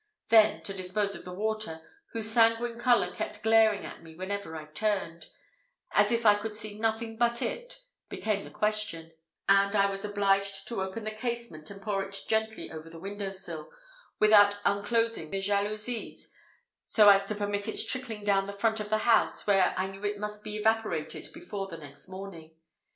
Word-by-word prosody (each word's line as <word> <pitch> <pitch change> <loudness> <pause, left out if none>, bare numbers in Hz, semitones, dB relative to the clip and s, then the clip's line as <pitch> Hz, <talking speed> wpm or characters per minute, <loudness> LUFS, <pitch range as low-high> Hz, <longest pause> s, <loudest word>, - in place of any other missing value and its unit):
Then 220 -1 +5
to 195 - -5
dispose 195 +2 -2
of - - -9
the 180 - -7
water, 215 -3 -3 0.3
whose 225 -1 -1
sanguine 230 +1 +3
colour 245 -1 +3
kept - - -5
glaring 220 -2 +4
in - - -9
my 165 - -12
eye - - -12
wherever 190 -1 -4
I 155 -1 -7
turned, 170 +1 -2 0.6
as 205 +1 +4
if 235 0 0
I 210 - +8
could 210 +1 -4
see 215 -1 -6
nothing 225 0 -1
but 235 0 +2
it, - - -4 0.3
became 210 -2 -1
the - - -10
question; 210 -6 -2 0.4
and 200 +1 +4
I 200 -1 +4
was 195 +1 -4
obliged 200 -1 0
to 230 -5 -2
open 190 +4 -4
the 215 - -3
casement, 220 -8 -5
and 195 0 -10
pour 205 -2 -1
it 195 0 -6
gently 220 0 -1
over 160 0 -8
the 165 - -11
window 200 +2 -5
sill, 175 -5 -5 0.5
without 205 -1 +6
unclosing 205 -3 +1
the 195 - -2
jalousies, 210 +4 -2 0.5
so 210 -2 +5
as 200 0 +5
to 210 - -3
permit 205 0 -2
its 220 - +5
trickling 235 -5 -3
down 195 -1 +2
the 200 - -5
front 220 +2 0
of 210 -1 -5
the 215 - +2
house, 230 -2 +3
where 195 -3 +3
I 185 - +1
knew 195 +1 -9
it 205 0 -1
must 210 0 -5
be 210 - -5
evaporated 220 -7 -1
before 205 - -6
the 170 -3 -8
next 145 +2 -11
morning. 185 -4 -9
205 Hz, 185 wpm, -29 LUFS, 195-220 Hz, 0.6 s, I